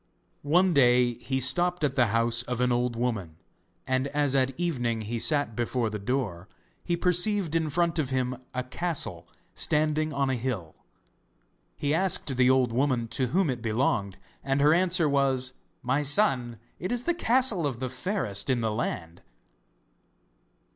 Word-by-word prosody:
One 175 +5 +3
day 125 -3 +4
he 130 +3 -3
stopped 175 +7 +3
at 140 -2 0
the 125 -3 +3
house 115 +2 +1
of 125 -1 -4
an 125 0 +2
old 120 0 0
woman, 110 -9 -3 0.5
and 130 +1 0
as 145 -1 0
at 135 0 0
evening 120 -10 -1
he 115 +2 -4
sat 145 -4 0
before 120 -1 -1
the 105 - -4
door, 100 -6 -3 0.4
he 175 -1 -1
perceived 180 0 +2
in 160 -2 +1
front 170 +2 0
of 140 -4 -1
him 130 -1 -1
a 125 0 -3
castle 165 +5 -3 0.3
standing 155 +1 0
on 140 -1 0
a - - 0
hill. 115 -10 -4 1.0
He 145 0 -1
asked 165 -5 +1
the 125 0 +4
old 130 -3 +2
woman 125 -3 0
to 130 +1 -1
whom 180 +7 +1
it 125 -4 -3
belonged, 110 -3 -1 0.3
and 135 0 0
her 150 +2 +5
answer 175 -1 +2
was: 135 -2 +1 0.3
'My 130 +4 +1
son, 135 - +1 0.2
it 185 - -4
is 245 0 0
the 345 - +1
castle 240 - +2
of 125 -5 -5
the 130 - -2
Fairest 125 - -2
in 125 -2 +1
the 110 -1 0
Land! 90 -6 -4
130 Hz, 165 wpm, -27 LUFS, 120-155 Hz, 1.0 s, her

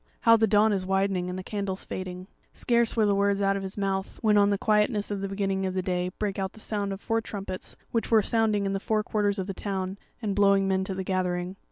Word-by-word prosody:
how 230 -1 +7
the 220 0 +3
dawn 210 +1 +4
is 190 -2 -1
widening 190 -1 0
and 180 - -4
the 185 - -5
candles 200 -1 -4
fading." 185 -1 -6 0.3
Scarce 235 -1 +1
were 220 -2 +3
the 205 - +3
words 200 0 +2
out 195 0 +2
of 195 - -2
his 190 +1 -6
mouth, 195 -1 -2
when 215 -1 +4
on 205 0 +5
the 200 - +1
quietness 210 0 +1
of 200 -1 -2
the 195 - -2
beginning 195 -1 -1
of 190 0 -1
day 180 -1 -1
brake 205 -2 -2
out 190 -1 -2
the - - -14
sound 205 -2 -2
of 195 - -5
four 225 +1 0
trumpets, 195 -4 -6
which 230 - -1
were 220 -2 +5
sounding 215 -3 +2
in 195 - -1
the 195 - -1
four 215 +1 0
quarters 205 -1 0
of 190 - -2
the 195 - -4
town, 190 0 -4 0.2
and 210 -4 -2
blowing 200 -1 +4
men 190 0 +1
to 190 - -4
the 190 - -3
gathering. 180 -1 -1
195 Hz, 250 wpm, -27 LUFS, 190-210 Hz, 0.3 s, how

